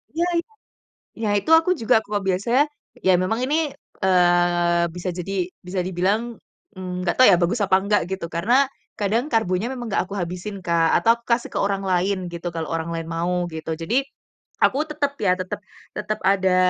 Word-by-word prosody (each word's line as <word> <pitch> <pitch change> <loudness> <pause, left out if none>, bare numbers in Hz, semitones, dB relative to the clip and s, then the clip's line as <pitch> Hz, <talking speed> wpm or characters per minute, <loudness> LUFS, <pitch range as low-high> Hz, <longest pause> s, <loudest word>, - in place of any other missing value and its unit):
iya 340 +1 +1
iya. 395 +7 -3 0.7
Ya 215 - +1
itu 315 - -4
aku 330 +3 0
juga 225 - +3
kok 205 0 -2
biasanya, 235 +9 +2 0.4
iya 190 - +4
memang 225 +6 -1
ini, 295 +4 +1 0.5
eee, 175 -1 +3
bisa 180 +1 -4
jadi 195 +3 -4 0.3
bisa 185 0 -2
dibilang, 205 +6 -1 0.4
mmm, 180 -1 -5
nggak 175 - 0
tahu 255 - +8
ya - - +6
bagus 215 +6 +1
apa 190 -1 +4
nggak 210 0 +3
gitu, 190 -3 -3
karena 180 +10 0 0.5
kadang 220 +5 +1
karbonya 205 -1 +1
memang 245 -2 -6
nggak - - +1
aku 200 - -6
habisin 180 +3 -5
Kak, 165 -1 +2
atau 230 0 +5
kasih 235 0 +1
ke - - 0
orang 200 -1 0
lain 185 +1 +1
gitu, 170 +1 -4
kalau 160 -1 -3
orang 165 0 -2
lain 165 0 -4
mau 175 +1 -1
gitu. 160 0 -4
Jadi 230 +12 0 0.6
aku 270 - +3
tetep 285 -2 -1
ya, 180 - +4
tetep 185 +3 -4 0.4
tetep 215 0 -2
ada 190 -1 +3
190 Hz, 180 wpm, -23 LUFS, 175-225 Hz, 0.7 s, tahu